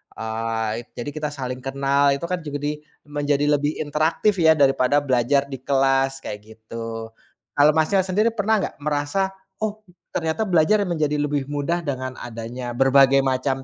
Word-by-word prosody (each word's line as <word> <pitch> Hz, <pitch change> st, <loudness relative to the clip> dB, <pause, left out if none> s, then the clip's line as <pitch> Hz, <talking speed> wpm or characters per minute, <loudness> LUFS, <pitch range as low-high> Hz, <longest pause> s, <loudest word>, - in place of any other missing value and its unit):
eee, 110 Hz, 0 st, -2 dB, 0.2 s
jadi 120 Hz, -, -5 dB
kita 155 Hz, 0 st, -3 dB
saling 130 Hz, -3 st, -5 dB
kenal 140 Hz, +1 st, +2 dB
itu 140 Hz, -, -8 dB
kan 180 Hz, +1 st, -2 dB
juga 145 Hz, -1 st, -5 dB
di 150 Hz, +1 st, -2 dB, 0.3 s
menjadi 145 Hz, 0 st, 0 dB
lebih 145 Hz, +2 st, -1 dB
interaktif 160 Hz, +7 st, +1 dB
ya 160 Hz, 0 st, +6 dB
daripada 135 Hz, 0 st, +3 dB
belajar 135 Hz, +1 st, +2 dB
di 135 Hz, -, -5 dB
kelas 135 Hz, 0 st, +1 dB
kayak 105 Hz, -, -5 dB
gitu. 115 Hz, 0 st, -7 dB, 0.4 s
Kalau, 145 Hz, +1 st, +6 dB
Masnya, 160 Hz, +5 st, +3 dB
sendiri 210 Hz, +5 st, +2 dB
pernah 220 Hz, +1 st, +2 dB
nggak -, -, -4 dB
merasa, 150 Hz, +6 st, 0 dB, 0.3 s
oh, 215 Hz, 0 st, -3 dB, 0.3 s
ternyata 165 Hz, +6 st, 0 dB
belajar 185 Hz, +4 st, +3 dB
menjadi 155 Hz, -4 st, 0 dB
lebih 145 Hz, -1 st, -1 dB
mudah 170 Hz, +4 st, -1 dB
dengan 130 Hz, -2 st, -3 dB
adanya 120 Hz, +1 st, -6 dB
berbagai 135 Hz, +1 st, +5 dB
macam 130 Hz, 0 st, 0 dB
140 Hz, 155 wpm, -23 LUFS, 130-155 Hz, 0.4 s, ya